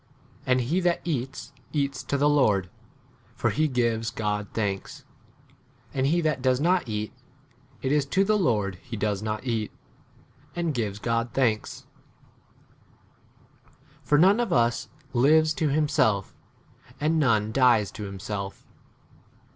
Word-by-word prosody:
] - - -29
h 145 - -25
And 130 0 +3
1 120 - -3
he 175 +4 +2
that 175 -2 +1
eats, 135 -6 -4 0.2
eats 140 -3 -1
to 140 +2 -2
the 145 +1 +3
Lord, 105 -11 +2 0.6
for - - 0
he 155 +1 +1
gives 115 -4 0
God 105 -3 -2
thanks; 100 -3 -3 0.9
[and 135 0 +1
he 170 +4 +2
that 155 -5 0
does 130 -1 +2
not 175 -3 +1
eat, 105 +2 -3 0.7
[it 135 - 0
is] 145 -1 +2
to 190 +7 +2
[the] 215 +1 +3
Lord 105 - 0
he 115 - -7
does 105 -1 -1
not 110 +3 -3
eat,]J 115 +8 -8
and 170 -3 0
gives 105 -5 -2
God 115 +2 -1
thanks. 115 -5 0 1.8
7 - - -29 0.2
For 150 - +2
none 190 +8 +5
of 240 - -1
us 120 -1 +1 0.2
lives 155 +5 +4
to 155 -1 0
himself, 135 -9 +1 0.6
8 - - -30
and 160 +2 +2
none 110 -7 +2
dies 120 -6 +4
to 105 - -7
himself. 100 0 -6
125 Hz, 150 wpm, -26 LUFS, 110-150 Hz, 1.8 s, none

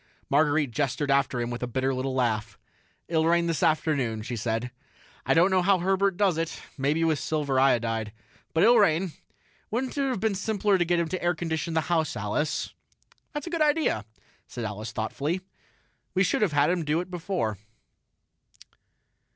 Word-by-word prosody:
Marguerite 145 -1 +3
gestured 140 +2 -1
after 135 -2 +2
him 120 0 -2
with 120 - -5
a 125 - -2
bitter 130 +2 0
little 130 +1 -2
laugh. 110 -4 -1 0.5
"It'll 160 -1 +1
rain 170 0 +3
this 165 -4 -1
afternoon," 140 -8 +1
she 120 +2 -4
said. 115 +2 -2 0.6
"I - - +4
don't 175 +4 +5
know 185 -1 +4
how 195 +1 +4
Herbert 190 +1 +1
does 190 -6 +2
it 165 0 -3 0.2
maybe 145 +4 +1
with 160 -3 +2
silver 145 -4 0
iodide. 115 -5 +2 0.4
But 160 - +2
it'll 235 0 +7
rain. 185 -2 +3 0.6
Wouldn't 250 +4 -2
it 280 -1 0
have 255 -6 -1
been 220 0 +1
simpler 205 0 +1
to 175 - +2
get 175 +1 +2
him 170 - 0
to 185 - -3
air 175 0 +1
condition 160 0 -3
the 160 - +3
house, 160 -2 0
Alice?" 105 +9 -2 0.6
"That's 295 -1 -4
a 340 - -6
good 335 -2 -1
idea," 300 - +2 0.4
said 120 -2 -5
Alice 105 +1 -5
thoughtfully. 145 +11 -2 0.7
"We 185 - +4
should 190 - +1
have 195 -7 +2
had 145 +3 +3
him 180 -2 0
do 155 +2 +1
it 180 +1 -6
before." 165 - -2
160 Hz, 180 wpm, -27 LUFS, 130-185 Hz, 0.7 s, it'll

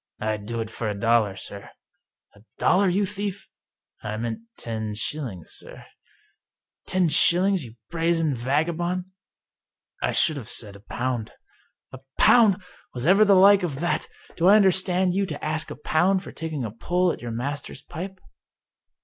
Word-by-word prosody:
" - - -55
I'd 105 -1 -3
do 115 0 -3
it 110 0 -6
for 115 -1 -3
a 100 -1 -4
dollar, 115 -2 +2
sir." 100 +1 -8 0.6
"A 100 - -20 0.2
dollar, 190 +1 +3
you 195 +3 +1
thief?" 200 0 -5 0.3
" - - -46
I 105 0 -4
meant 115 0 -3 0.2
ten 110 -2 -4
shillings, 115 - -5
sir." - - -9 0.5
" - - -52
Ten 185 -2 +2
shillings, 180 +3 +3
you 115 -1 -12 0.2
brazen 165 -2 +1
vagabond? 165 +8 -1 0.3
" - - -66
" - - -38
I - - +1
should 155 -3 +2
have 120 -4 -7
said 105 -4 -5
a - - -12
pound." 120 +2 -4 0.3
" - - -45
A 130 - -8 0.2
pound! 205 -5 +5 0.3
Was 125 +1 -3
ever 195 +5 +6
the 200 -2 +5
like 195 +1 +7
of 150 -7 -3
that! 175 - -1 0.3
Do 175 - +2
I 200 - +8
understand 185 -2 +3
you 195 +1 0
to 150 -3 -6
ask 155 -1 -2
a - - -6
pound 185 +6 +1
for - - -9
taking 160 -6 -4
a 110 - -5
pull 175 - 0
at - - -7
your 120 - -5
master's 140 +6 -5
pipe? 190 +3 -7
155 Hz, 180 wpm, -25 LUFS, 115-185 Hz, 0.6 s, I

